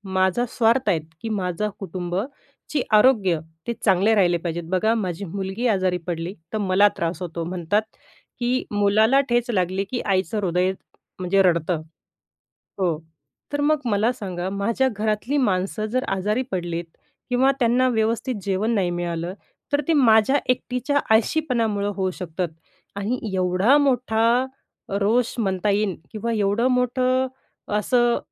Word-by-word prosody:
माझा 190 +6 +2
स्वार्थ 235 +1 +2
आहेत 165 -5 +2 0.2
की 225 - -4
माझं 195 0 -1
कुटुंबची 190 - -5
आरोग्य, 210 -7 +4 0.3
ते 235 - 0
चांगले 195 +3 +4
राहिले 175 -3 +3
पाहिजेत. 170 0 -4
बघा 220 +5 +2
माझी 190 -2 -3
मुलगी 195 +6 -3
आजारी 185 -4 +1
पडली 170 +2 -3 0.2
तर - - 0
मला 200 0 +4
त्रास 170 +1 -2
होतो. 170 -1 -4
म्हणतात 180 +4 0 0.6
की 245 +1 0
मुलाला 215 +6 +4
ठेच 240 0 +1
लागली 190 0 0
की 245 - -1
आईचं 195 +2 0
हृदय 180 0 +1 0.5
म्हणजे 190 +2 +2
रडतं 170 -2 +1 1.0
हो. 170 -5 +1 0.6
तर 290 - 0
मग 305 0 +3
मला 220 +2 +2
सांगा, 185 -5 -4
माझ्या 225 +7 0
घरातली 215 +6 0
माणसं 200 -2 0
जर 255 +4 -1
आजारी 210 +6 0
पडलीत 175 -2 -3 0.4
किंवा 260 +2 +4
त्यांना 250 +2 +3
व्यवस्थित 230 +2 0
जेवण 200 +3 0
नाही 185 -3 +1
मिळालं, 175 0 -3 0.4
तर 290 - +3
ते 330 - +3
माझ्या 250 0 +5
एकटीच्या 255 +3 0 0.2
आळशीपणामुळं 225 -6 +1
होऊ 190 -1 0
शकतात. 180 0 -3 0.5
आणि 215 +5 -2
एवढा 185 +9 +3
मोठा 245 -3 +2 0.5
रोष 230 +4 +2
म्हणता 195 -1 0
येईन 200 -3 0 0.2
किंवा 230 +1 -3
एवढं 210 +3 +1
मोठं 255 +1 +1 0.5
असं 240 +2 +2
205 Hz, 135 wpm, -23 LUFS, 185-240 Hz, 1.0 s, माझ्या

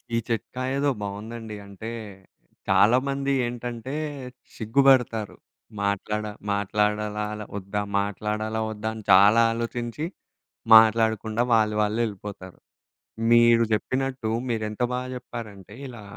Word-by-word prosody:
ఈ - - +2
చిట్కా 120 +2 -3
ఏదో 140 +1 +1
బాగవుందండి. 110 +2 -6
అంటే, 100 +3 -7 0.8
చాలామంది 135 +4 +3
ఏంటంటే 120 +1 -5 0.6
సిగ్గుబడతారు. 120 -2 +2 0.5
మాట్లాడ 100 +1 -1 0.3
మాట్లాడాలాలా 105 +1 -1
ఒద్దా? 100 +1 -3 0.2
మాట్లాడాల 105 +2 -2
ఒద్దా 110 0 -4
అని 110 -1 -9
చాలా 100 +4 +7
ఆలోచించి. 120 +4 -4 0.7
మాట్లాడకుండా 110 0 +4
వాళ్ళు 110 -1 +3
వాళ్ళె 105 +2 0
వెళ్ళిపోతారు. 100 -3 -8 0.8
మీరు 120 0 +6
చెప్పినట్టు 130 +2 -1 0.2
మీరు 115 -2 -1
ఎంత 105 +3 -5
బాగా 125 +1 -3
చెప్పారంటే 105 -5 -9
ఇలా 120 -4 -10
110 Hz, 100 wpm, -25 LUFS, 105-120 Hz, 0.8 s, చాలా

